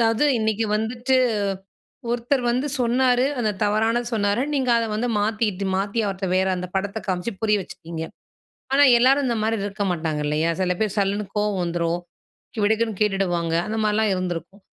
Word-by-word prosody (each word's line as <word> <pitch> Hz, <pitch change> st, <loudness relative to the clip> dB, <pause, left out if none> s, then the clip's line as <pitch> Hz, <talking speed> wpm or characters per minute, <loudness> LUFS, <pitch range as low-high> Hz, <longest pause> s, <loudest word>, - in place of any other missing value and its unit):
அதாவது 225 Hz, +4 st, +3 dB
இன்னைக்கி 220 Hz, 0 st, 0 dB
வந்துட்டு, 240 Hz, +4 st, 0 dB, 0.9 s
ஒருத்தர் 245 Hz, +3 st, 0 dB
வந்து 255 Hz, +4 st, 0 dB
சொன்னாரு, 250 Hz, +1 st, +3 dB, 0.2 s
அத 215 Hz, -3 st, +1 dB
தவறானது 225 Hz, +3 st, +1 dB
சொன்னாரு. 205 Hz, +2 st, +1 dB
நீங்க 260 Hz, -3 st, +1 dB
அத 230 Hz, -, +1 dB
வந்து 235 Hz, +3 st, -1 dB
மாத்திட்டு, 210 Hz, -2 st, -1 dB
மாத்தி 200 Hz, +4 st, -1 dB
அவர்ட்ட 190 Hz, -1 st, -3 dB
வேற 190 Hz, 0 st, +2 dB
அந்த 180 Hz, 0 st, -4 dB
படத்த 200 Hz, +3 st, -2 dB
காமிச்சு 185 Hz, +5 st, -1 dB
புரிய 210 Hz, -1 st, +3 dB
வச்சிட்டீங்க. 165 Hz, -2 st, -8 dB, 0.7 s
ஆனா 285 Hz, +1 st, +6 dB
எல்லாரும் 265 Hz, +3 st, +4 dB
இந்த 235 Hz, -2 st, 0 dB
மாரி 225 Hz, +1 st, +1 dB
இருக்க 205 Hz, 0 st, -3 dB
மாட்டாங்க 160 Hz, -3 st, -2 dB
இல்லயா? 155 Hz, +3 st, +1 dB
செல 180 Hz, -1 st, +1 dB
பேர் 215 Hz, -2 st, -1 dB
சல்லுன்னு 200 Hz, +1 st, 0 dB
கோவம் 210 Hz, -2 st, 0 dB
வந்துரும். 170 Hz, 0 st, -1 dB, 0.6 s
விடுக்குன்னு 220 Hz, -1 st, +1 dB
கேட்டுடுவாங்க. 175 Hz, -5 st, 0 dB
அந்த 220 Hz, -, -3 dB
மாரிலாம் 215 Hz, 0 st, +2 dB
இருந்திருக்கும். 185 Hz, +1 st, -5 dB
210 Hz, 155 wpm, -23 LUFS, 185-230 Hz, 0.9 s, ஆனா